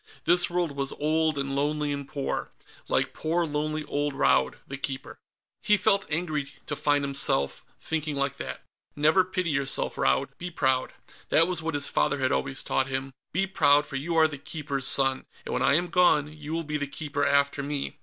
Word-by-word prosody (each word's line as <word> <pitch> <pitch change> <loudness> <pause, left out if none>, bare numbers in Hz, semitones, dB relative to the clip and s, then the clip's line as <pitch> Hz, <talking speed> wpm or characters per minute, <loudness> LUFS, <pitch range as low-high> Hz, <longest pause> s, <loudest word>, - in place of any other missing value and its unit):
This 175 +1 +3
world 175 -2 0
was 140 -1 -3
old 155 0 +1
and 135 0 -2
lonely 150 +1 0
and 140 -1 -5
poor. 140 -2 -3 0.4
Like - - 0
poor 165 +2 0
lonely 155 0 -2
old 145 0 -1
Raud 140 - +3
the 140 - -5
Keeper. 135 -1 -5 0.4
He 210 - +4
felt 200 -1 +2
angry 155 -3 -1 0.2
to 145 - -3
find 145 0 +1
himself 135 - 0 0.2
thinking 155 -2 -2
like 140 -1 -1
that. - - -6 0.3
Never 155 +6 +4
pity 185 -2 -2
yourself, 140 -1 0
Raud; 65 0 +2
be 180 - -4
proud. 130 -6 +1 0.4
That 165 - +5
was 180 -2 -2
what 160 -1 -2
his 145 -1 +1
father - - +1
had 130 -1 0
always 135 -1 -1
taught 130 - 0
him: 135 0 -3 0.2
"Be 190 +4 +1
proud, 145 -6 +4
for 140 - -8
you 160 +5 -2
are 160 -1 +6
the 145 -3 -8
Keeper's 140 -3 -2
son, 135 -1 +3 0.2
and - - -4
when - - 0
I 140 - +4
am 175 +3 +2
gone, 155 -4 +3
you 150 0 -8
will 165 0 -1
be 150 -1 -2
the 145 -1 -3
Keeper 145 0 -3
after 140 0 +2
me. 140 0 -4
145 Hz, 195 wpm, -27 LUFS, 140-160 Hz, 0.4 s, are